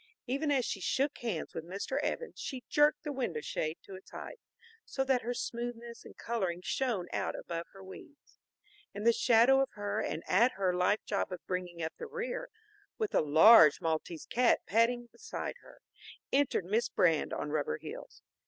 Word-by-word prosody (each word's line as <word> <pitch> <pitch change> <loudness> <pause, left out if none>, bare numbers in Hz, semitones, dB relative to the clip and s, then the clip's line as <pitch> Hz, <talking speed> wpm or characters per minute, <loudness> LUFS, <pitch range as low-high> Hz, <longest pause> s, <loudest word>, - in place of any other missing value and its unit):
Even 280 +5 -1
as 265 -4 +2
she 195 - -3
shook 275 +9 0
hands 225 -9 -3
with 165 - -5
Mr. 195 +10 -3
Evans, 480 +10 -3
she 260 -3 -5
jerked 295 0 +3
the 300 - -3
window 245 - -2
shade 155 +2 -3
to 195 - -12
its 190 0 -11
height, - - -8 0.4
so 270 - -2
that 260 -2 +2
her 245 +2 -3
smoothness 235 0 -5
and - - -13
coloring 190 -7 -2
shone 225 -9 -1
out - - -1
above 170 -1 -5
her 195 -1 -12
weeds. 285 +10 -14 0.6
In 205 - -5
the 235 +1 +5
shadow 245 +3 +5
of 270 - 0
her 205 0 -3
and 155 +3 -3
at 235 +7 +4
her 190 -2 0
life 180 +4 +1
job 200 -2 -1
of 180 - -7
bringing 180 -2 -4
up 160 - -3
the 470 - -5
rear, 485 +2 -4 0.5
with 435 -2 -2
a - - +4
large 155 +2 +7
Maltese 160 0 -3
cat 245 0 +3
padding 235 +3 +2
beside 440 +2 -6
her, - - -18 0.5
entered 275 -9 +2
Miss 215 +6 0
Brand 165 -4 +2
on 150 - -3
rubber 145 - -1
heels. - - -10
225 Hz, 180 wpm, -32 LUFS, 180-265 Hz, 0.6 s, large